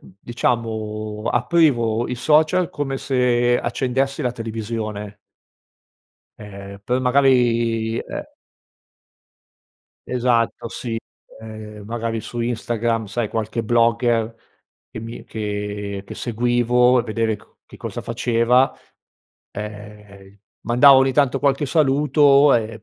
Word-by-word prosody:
diciamo, 110 0 -3
aprivo 120 -4 +2
il 125 - -3
social 155 +7 +2
come 135 -2 -3
se 120 -2 +1
accendessi 135 +4 -1
la 125 -1 -1
televisione. 110 -2 -5 1.2
Ehm, 100 -1 -10
per 125 +1 0
magari, 120 -4 +2
ehm - - -6 1.8
Esatto, 120 -2 0
sì, 115 -1 -4 0.4
ehm, 110 -1 -10
magari 115 -1 -3
su 120 +2 -6
Instagram, 115 -1 -1
sai, 115 +1 -2
qualche 110 +1 -3
blogger 115 0 +1 0.5
che - - -8
mi 115 +1 -8
che 105 -2 -5
che - - -8
seguivo 120 +1 +2
e - - -3
vedere 110 -1 -1
ch - - -20 0.2
che - - -14
cosa - - -6
faceva; 120 +2 +2 0.8
ehm, 105 -1 -10 0.3
mandavo 130 +3 +7
ogni 135 0 +2
tanto 140 -2 +2
qualche 140 +1 +1
saluto, 145 -1 +4
ehm, 110 -2 -1
115 Hz, 105 wpm, -21 LUFS, 110-125 Hz, 1.8 s, mandavo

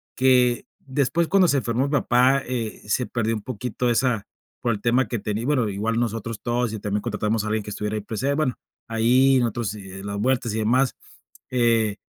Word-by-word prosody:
que 125 -2 +3
después, 140 +5 0
cuando 190 0 +4
se 145 - +3
enfermó 120 +1 0
mi - - -5
papá, 135 -1 +3
eh, 120 -3 -4
se 125 +4 0
perdió 115 -1 -1
un 105 - -5
poquito 125 +1 -3
esa, 120 -3 +1 0.3
por 120 - +1
el 105 -2 -3
tema 120 +3 +2
que 120 - -2
tenía 105 +3 -3
bueno 130 -5 +2
igual 110 +3 -1
nosotros 115 -1 -3
todos 120 -1 0
y 110 - -4
también 105 0 -2
contratamos 105 -1 -1
a - - -4
alguien 110 0 -1
que 105 - -7
estuviera 105 +1 -3
ahí 105 - -2
presente, 115 +7 -2
bueno, 150 -4 +1 0.3
ahí 125 +4 +4
nosotros 115 -3 -1
las 100 0 -7
vueltas 125 0 0
y 110 - -1
demás, 125 +4 +2 0.6
eh, 115 -4 +2
120 Hz, 195 wpm, -24 LUFS, 105-130 Hz, 0.6 s, cuando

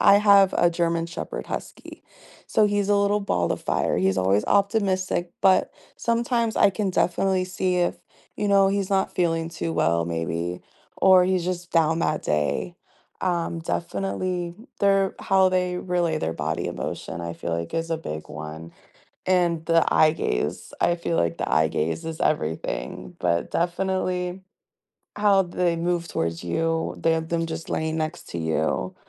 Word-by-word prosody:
I - - +7
have 200 -2 +6
a 175 - +4
German 170 -1 0
shepherd 170 - -6
husky. - - -7 0.5
So, 215 - +4
he's 205 -1 0
a 205 - +4
little 200 +1 +2
ball 90 - 0
of - - -6
fire, - - 0
he's 95 +1 +2
always 95 +2 +2
optimistic, 195 -3 +1
but 190 -1 +4 0.3
sometimes 235 -1 0
I - - +5
can 200 0 -1
definitely 185 +1 +1
see 185 0 -1
if, 175 -1 +1 0.4
you 205 - -1
know, 195 -1 +5
he's 195 -1 -1
not 195 -1 +1
feeling 165 -2 0
too 165 0 -4
well, 85 - +1
maybe, 85 +1 -3 0.4
or 185 -1 +6
he's 185 -2 +1
just 180 -1 -4
down 165 0 +3
that 155 - 0
day. 75 - -1 0.5
Um, 170 -2 -1
definitely 170 - -3 0.3
their 195 -1 +3
how 190 -1 +3
they 180 -1 0
relay 175 -2 0
their 80 0 -2
body 80 0 -2
emotion, 85 - -5
I 85 0 -5
feel 85 0 -4
like, 85 0 -5
is 165 0 -2
a 165 - +1
big 75 - -6
one, 80 +2 -8 0.5
and 175 -3 +1
the 165 0 +3
eye 155 - +6
gaze, 60 - -3
I 175 - +3
feel 170 -1 -2
like 85 - 0
the - - -3
eye 80 0 +3
gaze 80 +1 -2
is 165 -1 -5
everything, 80 - -2
but 85 -1 0
definitely, 180 +1 -1 0.8
how 200 -2 +4
they 175 -1 0
move 170 0 -1
towards 85 +1 -2
you, 165 - -1
their 165 0 +2
them 165 +1 -2
just 165 0 -6
laying 160 0 -1
next 155 +2 -4
to 85 - -4
you, 80 -1 -1
170 Hz, 165 wpm, -24 LUFS, -, 0.8 s, I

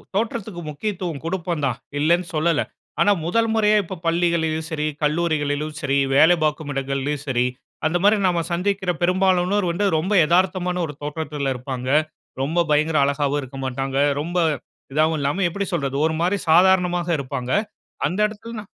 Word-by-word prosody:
தோற்றத்துக்கு 215 -4 -2
முக்கியத்துவம் 175 -1 -4
கொடுப்போம் 170 -3 -2
தான் 125 -3 -1 0.2
இல்லனு 170 +4 +2
சொல்லல. 160 0 +2 0.4
ஆனா 205 - +5
முதல் 225 +6 +1
முறையா 215 -1 +4
இப்ப 185 0 -7
பள்ளிகள்யும் 165 -2 +1
சரி 155 -2 -2 0.2
கல்லூரிகளிலும் 150 -1 0
சரி, 140 -2 +1 0.2
வேலை 160 +5 +6
பார்க்கும் 150 -1 -1
இடங்களிலும் 135 +1 -2
சரி, 125 -2 +1 0.4
அந்த 165 +3 +2
மாரி 210 +2 +5
நம்ம 175 -2 +1
சந்திக்கிற 190 +1 0
பெரும்பாலானோர் 185 +2 +2
வந்து 200 +4 -1
ரொம்ப 185 +7 -1
எதார்த்தமான 180 +1 +1
ஒரு 150 - -8
தோற்றத்தில 145 -2 -3
இருப்பாங்க. 125 0 -5 0.5
ரொம்ப 160 +6 0
பயங்கர 155 +1 +2
அழகாவும் 140 +1 0
இருக்க 135 0 -9
மாட்டாங்க. 135 +1 -2 0.2
ரொம்ப 175 +4 -3 0.6
இதாகவும் 155 +2 +2
இல்லாம 145 +8 0
எப்படி 200 +4 -3
சொல்றது 140 -5 -1
ஒரு 160 - +1
மாரி 185 +4 +2
சாதாரணமாக 180 0 +4
இருப்பாங்க. 130 -2 -4 0.6
அந்த 185 - -2
இடத்திலனா. 215 +1 -8
165 Hz, 145 wpm, -22 LUFS, 145-185 Hz, 0.6 s, வேலை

